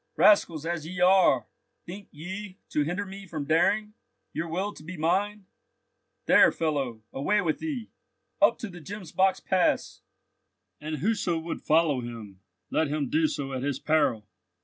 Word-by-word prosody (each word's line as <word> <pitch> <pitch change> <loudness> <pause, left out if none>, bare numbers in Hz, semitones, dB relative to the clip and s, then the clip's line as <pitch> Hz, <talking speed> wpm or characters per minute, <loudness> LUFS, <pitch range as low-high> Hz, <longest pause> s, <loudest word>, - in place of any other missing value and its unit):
"Rascals 170 -7 +4
as 165 -2 -3
ye 180 +1 -6
are, 180 - +5 0.4
think 195 +3 -9
ye 190 +5 -7
to 150 - 0
hinder 175 +7 -1
me 195 0 -9
from 155 -4 -4
daring? 205 +7 +2 0.4
Your 165 +2 -3
will 190 +5 -2
to - - -13
be 175 +3 -8
mine? 195 +6 0 0.8
There, - - +6
fellow; 135 -8 -2
away 150 +11 +1
with 160 -5 -1
thee! 280 -8 -4 0.5
Up - - +5
to 225 - -5
the 175 -2 -11
Gemsbock's 190 +1 0
Pass! 185 -2 0 0.8
And 155 +1 -4
whoso 190 0 0
would 160 +1 -5
follow 155 -3 +3
him, 115 -5 -8 0.3
let 160 - +2
him 145 -2 -2
do 160 0 +3
so 135 -2 -4
at 130 - -3
his 140 -1 -1
peril!" 140 -10 +1
165 Hz, 155 wpm, -27 LUFS, 150-195 Hz, 0.8 s, There